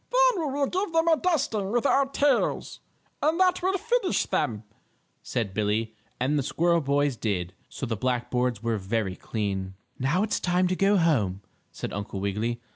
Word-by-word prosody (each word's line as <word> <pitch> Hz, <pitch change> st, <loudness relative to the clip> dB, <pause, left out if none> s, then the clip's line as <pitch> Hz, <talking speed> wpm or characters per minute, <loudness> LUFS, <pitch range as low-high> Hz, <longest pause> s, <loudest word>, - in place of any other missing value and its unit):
"Then -, -, +3 dB
we -, -, -2 dB
will 285 Hz, 0 st, +1 dB
give 365 Hz, +4 st, -2 dB
them 325 Hz, 0 st, +3 dB
a 330 Hz, -, +6 dB
dusting 265 Hz, -, 0 dB
with 240 Hz, +2 st, +1 dB
our 275 Hz, 0 st, +4 dB
tails, 280 Hz, +1 st, +1 dB, 0.4 s
and 315 Hz, +4 st, +2 dB
that 370 Hz, 0 st, +3 dB
will 380 Hz, +2 st, +1 dB
finish 460 Hz, 0 st, +1 dB
them," 110 Hz, -2 st, -1 dB, 0.6 s
said 115 Hz, -6 st, -3 dB
Billie, 110 Hz, +2 st, 0 dB, 0.3 s
and 140 Hz, +4 st, +1 dB
the -, -, +2 dB
squirrel 170 Hz, +5 st, +1 dB
boys 145 Hz, -1 st, +1 dB
did, 95 Hz, -6 st, -2 dB, 0.2 s
so -, -, -5 dB
the 115 Hz, -2 st, -2 dB
black 120 Hz, +2 st, -1 dB
boards 125 Hz, -3 st, 0 dB
were 115 Hz, -2 st, 0 dB
very 95 Hz, -1 st, -2 dB
clean. 95 Hz, -3 st, -3 dB, 0.2 s
"Now 145 Hz, +10 st, +1 dB
it's 215 Hz, -, 0 dB
time 180 Hz, +1 st, +2 dB
to 185 Hz, -, +1 dB
go 195 Hz, +2 st, +3 dB
home," 110 Hz, -, +1 dB, 0.3 s
said -, -, -6 dB
Uncle 100 Hz, -1 st, -4 dB
Wiggily. 105 Hz, +4 st, -2 dB
145 Hz, 180 wpm, -26 LUFS, -, 0.6 s, a